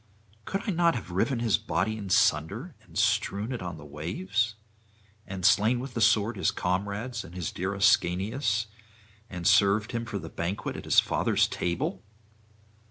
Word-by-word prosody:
Could 195 - -3
I - - +2
not 170 -3 +3
have 100 -7 -6
riven 115 +8 +1
his 115 -4 +2
body 110 +5 -1
in 100 -3 -6
sunder 100 - +2
and - - -12
strewn 105 +5 +1
it 125 - -4
on 90 -3 -5
the 75 - -11
waves? 95 +9 -2 0.7
and 95 -2 -4
slain 110 +5 +4
with 130 0 -6
the 115 - -2
sword 110 0 +3
his 95 - +2
comrades 100 +6 -2
and 85 - -12
his 90 -3 -3
dear 95 +3 -3
Ascanius, 105 +5 +2 0.6
and 90 -2 -6
served 105 +1 +4
him 115 -1 -3
for 115 -3 -4
the 85 - -7
banquet 85 +5 -4
at - - -7
his - - +6
father's - - +2
table? 145 - -2
100 Hz, 165 wpm, -28 LUFS, 90-115 Hz, 0.7 s, his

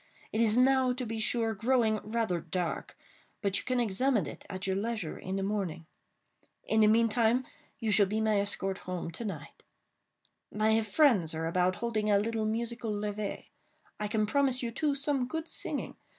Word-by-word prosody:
It 220 - +1
is 225 0 +3
now, 260 0 +4
to 250 0 -4
be 225 0 -4
sure, 225 +1 +1
growing 225 0 +2
rather 215 -5 -1
dark—but 190 +2 -4
you - - -8
can 255 -1 0
examine 235 +1 +1
it - - -9
at 185 -1 -4
your 190 -1 0
leisure 210 -4 -2
in 190 +1 -5
the 195 - -1
morning. 190 -5 -2 0.8
In 220 - +2
the 215 - +6
meantime, 230 +2 +3 0.3
you 225 -2 -1
shall 200 -1 +5
be 215 +3 -1
my 215 -2 +2
escort 195 -1 0
home 175 -2 -3
to 200 - -6
night. 160 -8 -7 0.9
My 220 +1 +2
friends 210 - +3
are 160 +1 -2
about 180 +2 +1
holding 215 -2 -1
a 205 - +5
little 220 +1 0
musical 230 +1 -2
levée. 205 0 -4 0.5
I 210 - -1
can 215 0 +1
promise 260 +2 +2
you, 235 - -2
too, 290 +4 0
some 280 -2 0
good 320 +4 -4
singing. - - -4
220 Hz, 175 wpm, -30 LUFS, 200-235 Hz, 0.9 s, the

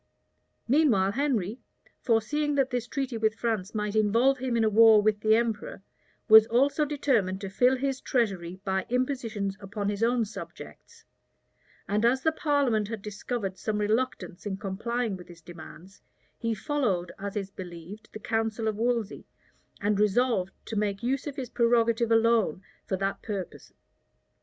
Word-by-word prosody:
Meanwhile 235 -9 +3
Henry, 240 -4 -1 0.4
foreseeing 290 +6 +1
that 275 -1 +1
this 245 -1 -2
treaty 265 -2 -3
with 220 -1 +1
France 220 -4 -2
might 210 0 -2
involve 230 +6 +3
him 250 -2 -1
in 225 - +2
a - - +3
war 220 0 +7
with 210 0 +2
the 215 +1 +4
emperor, 225 -4 -2 0.4
was 220 -1 +9
also 275 +6 +2
determined 250 -10 0
to 195 -2 -5
fill 250 +5 +3
his 270 0 -2
treasury 190 -7 -1
by 190 -1 -1
impositions 235 -6 -2
upon 205 0 -4
his 205 0 -3
own 235 0 +2
subjects; 455 - -11 0.8
and 210 +2 0
as 255 +3 +2
the 320 - +3
parliament 280 -9 +1
had 220 -2 -6
discovered 205 -1 -4
some 215 -1 -2
reluctance 210 -4 -2
in 190 -1 -3
complying 215 +2 -3
with 180 - -13
his 170 -1 -15
demands, 175 +3 -12 0.3
he 230 -1 -2
followed, 205 - -1
as 200 0 -5
is 195 -2 -3
believed, 180 +3 -10
the - - -7
counsel 225 0 -2
of 215 -1 -1
Wolsey, 230 -2 -1 0.5
and 205 0 +1
resolved 210 -2 +2
to 225 - -6
make 205 0 -1
use 265 +4 -1
of 285 - -5
his 260 -4 -6
prerogative 235 -1 +2
alone 225 -6 +3 0.2
for 190 - -1
that 195 +1 -2
purpose. 200 -5 -6
220 Hz, 155 wpm, -27 LUFS, 200-245 Hz, 0.8 s, was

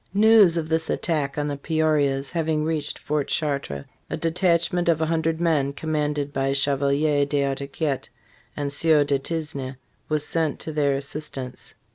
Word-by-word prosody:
News 210 -5 +6
of 160 -2 -1
this 160 0 -1
attack 150 -5 -1
on 145 0 0
the 145 -1 -3
Peorias 145 -3 +1
having 160 -2 0
reached 155 -2 -2
Fort 150 -1 -2
Chartres, 140 - -2 0.2
a - - -3
de 165 - -1
tachment 175 0 +1
of 165 -2 +3
a 160 - +1
hundred 160 0 0
men, 150 -5 +1
commanded 150 -1 -2
by 135 0 0
Chevalier 140 +1 +2
d'Artaguiette 140 0 -2 0.5
and 140 -1 -2
Sieur 155 0 +4
de 140 -1 0
Tisne, 140 -4 -4 0.3
was 155 -1 +1
sent 160 -3 0
to 160 - -2
their 145 -2 +1
assistance. 140 -2 -4
150 Hz, 155 wpm, -24 LUFS, 140-160 Hz, 0.5 s, News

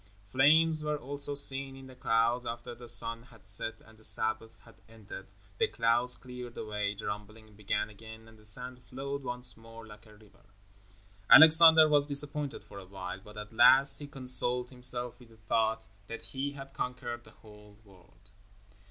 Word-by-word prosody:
Flames 155 +4 +2
were 150 0 -4
also 145 +1 -7
seen 135 -1 +2
in 135 0 -14
the 130 - -15
clouds. 120 0 -2
After 120 0 -9
the 120 0 -15
sun 115 0 +5
had 115 -3 -21
set 110 +2 +3
and 110 0 -22
the - - -16
Sabbath 110 +1 +1
had 115 - -20 0.2
ended, 100 -3 -14 0.3
the - - 0
clouds 120 +2 +1
cleared 125 -1 -12
away, 105 -1 -5
the - - -11
rumbling 110 +1 -10
began 105 0 -4
again 110 +1 -15
and 110 - -19
the 110 -1 -23
sand 125 +4 -5
flowed 140 +3 -8
once 125 -1 -4
more 115 0 -16
like 105 +1 -17
a 105 - -19
river. 105 -1 -24 0.9
Alexander 160 0 +7
was 145 -1 0
disappointed 145 0 +1
for 100 - -14
a 95 - -14
while, 95 0 -10
but 105 0 -16
at 105 +1 -11
last 135 +4 +5
he 145 - -10
consoled 125 -2 +2
himself 125 -1 -3
with 120 -2 -19
the 115 - -22
thought 110 +1 -3 0.2
that 115 - -10
he 140 +1 -6
had 135 -1 -13
conquered 120 -2 -7
the - - -19
whole 105 -1 -20
world. 95 0 -23
120 Hz, 180 wpm, -28 LUFS, 110-135 Hz, 0.9 s, Alexander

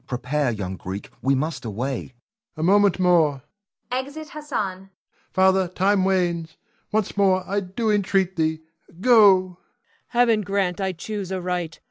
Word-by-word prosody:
Prepare, 130 +3 -1
young 95 -5 -4
Greek; 95 +3 -7
we 135 +2 +2
must 155 +4 -3
away. 120 +5 -3
Ion. - - -11 0.5
A 155 - -2
moment 200 +2 +4
more. 160 -7 +3 0.5
[Exit 280 +4 -4
Hassan.] 200 -11 -4 0.4
Father, 190 0 +3
time 190 +2 +1
wanes. 175 -4 0 0.3
Once 215 -2 -1
more 190 -2 +3
I 200 +2 0
do 200 +4 -2
entreat 195 -2 +1
thee, 160 -1 0 0.4
go! 245 +5 +4 0.3
Cleon. 185 -1 -12 0.5
Heaven 235 -3 +3
grant 195 -2 -1
I 190 -1 -1
choose 195 +2 -6
aright! 180 -3 -3
185 Hz, 140 wpm, -23 LUFS, 160-200 Hz, 0.5 s, moment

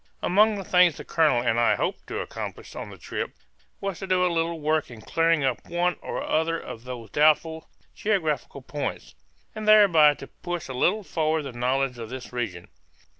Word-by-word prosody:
Among 210 +3 +4
the 195 - -5
things 180 -3 +4
the - - -7
colonel 150 -7 +2
and 115 -1 +1
I 120 - +4
hoped - - -3
to - - -3
accomplish - - -7
on - - -6
the - - -11
trip - - -5 0.4
was 195 -3 -4
to 195 - -6
do 185 -1 +3
a 175 - +1
little 165 0 -1
work 155 0 0
in 115 -3 -11
clearing 165 +1 +2
up 130 -2 -2
one 175 +1 +1
or - - -4
the - - -4
other 165 +1 0
of - - -8
these 125 -3 -7
two - - -26
doubtful 155 +2 +2 0.2
geographical 155 -9 -1
points, 145 +2 -5 0.4
and 215 -1 -6
thereby 175 -9 +7
to 135 - -9
push 175 +3 -6
a 130 - -6
little 195 +11 +1
forward 160 -3 0
the 135 - -6
knowledge 125 +1 -1
of 115 -1 -6
this 125 0 -8
region. 105 -8 -4
155 Hz, 200 wpm, -25 LUFS, 130-175 Hz, 0.4 s, thereby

